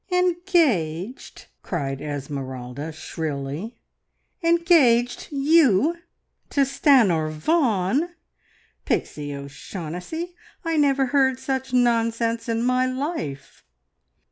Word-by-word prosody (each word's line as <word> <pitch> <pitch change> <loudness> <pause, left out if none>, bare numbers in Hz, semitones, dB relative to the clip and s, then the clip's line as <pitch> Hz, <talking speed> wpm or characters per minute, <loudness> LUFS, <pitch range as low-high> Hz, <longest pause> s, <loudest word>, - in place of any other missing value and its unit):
"Engaged!" 320 - 0 0.2
cried 140 -6 -3
Esmeralda 140 -1 -5
shrilly. 155 - -5 0.6
"Engaged! 330 -9 +3
You! 290 - +4 0.5
To 280 - +1
Stanor 225 - +3
Vaughan? 235 - +1 0.7
Pixie 145 -1 -2
O'Shaughnessy, 175 - -6 0.3
I 330 0 0
never 280 -3 +3
heard 265 -2 +3
such 265 -1 -3
nonsense 230 -1 +1
in 230 0 0
my 255 +1 +2
life." 255 - -5
235 Hz, 80 wpm, -23 LUFS, -, 0.7 s, You